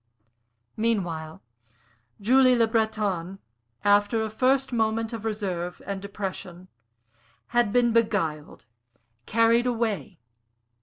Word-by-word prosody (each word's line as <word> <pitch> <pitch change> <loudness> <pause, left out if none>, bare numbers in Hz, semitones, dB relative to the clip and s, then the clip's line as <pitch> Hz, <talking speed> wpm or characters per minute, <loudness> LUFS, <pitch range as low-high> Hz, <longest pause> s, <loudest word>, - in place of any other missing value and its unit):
Meanwhile, 175 -8 -2 0.8
Julie 255 +4 +5
Le 230 -1 +4
Breton, 215 -5 -1 0.5
after 205 +2 +3
a 220 - -4
first 260 +3 +1
moment 225 0 0
of 225 -1 -6
reserve 185 -5 -3
and 200 -1 -4
depression, 185 -3 -6 0.8
had 240 -3 +2
been 240 0 +3
beguiled, 190 -10 -1 0.6
carried 230 +2 +3
away. 225 -6 -2
220 Hz, 95 wpm, -26 LUFS, 195-230 Hz, 0.8 s, Julie